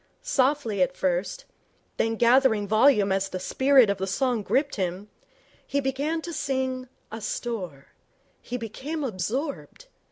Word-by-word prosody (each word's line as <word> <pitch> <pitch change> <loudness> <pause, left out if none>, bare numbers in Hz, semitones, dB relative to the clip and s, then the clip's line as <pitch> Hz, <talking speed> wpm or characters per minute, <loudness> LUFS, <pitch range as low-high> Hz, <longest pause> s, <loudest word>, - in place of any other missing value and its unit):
Softly 260 -5 +1
at 270 0 +1
first, 185 - -1 0.5
then 225 0 +1
gathering 235 -3 +4
volume 215 -2 +4
as 195 0 0
the 185 - -4
spirit 265 +5 +4
of 200 -1 -1
the 190 - -2
song 245 +3 0
gripped 280 +7 0
him, 190 +2 -3 0.6
he 280 - 0
began 285 +4 -1
to 340 - -6
sing 260 -3 -2 0.2
'Asthore'. 210 - -5 0.6
He 250 - -5
became 270 +7 -5
absorbed. 260 - -4
245 Hz, 130 wpm, -26 LUFS, 200-275 Hz, 0.6 s, gathering